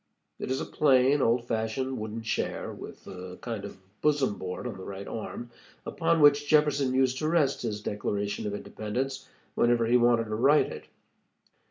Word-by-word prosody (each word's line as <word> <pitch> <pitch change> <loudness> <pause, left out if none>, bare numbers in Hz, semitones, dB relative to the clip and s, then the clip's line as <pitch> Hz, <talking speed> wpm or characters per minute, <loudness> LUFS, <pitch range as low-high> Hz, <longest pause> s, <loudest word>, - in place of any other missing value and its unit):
It - - -4
is 130 +1 0
a - - -3
plain, 135 0 +3
old 120 0 +2
fashioned 120 +3 -2
wooden 110 +1 -5
chair, 115 - -2
with - - -10
a 90 0 -8
kind 115 -4 -5
of 100 - -8 0.2
bosom 145 -7 +1
board 90 +5 -5
on 125 - -4
the 95 - -9
right 100 0 -7
arm, 120 +1 -6 0.3
upon 165 -1 +1
which 145 0 +5
Jefferson 145 -3 +3
used 130 0 +2
to 155 - -1
rest 155 -4 +2
his 105 -3 -3
Declaration 100 0 -2
of 105 - -3
Independence 130 +6 -4 0.2
whenever 120 -1 +3
he 120 +2 +4
wanted 120 -1 +4
to 110 -1 -6
write 140 +7 +4
it. - - -8
120 Hz, 175 wpm, -28 LUFS, 110-135 Hz, 0.3 s, which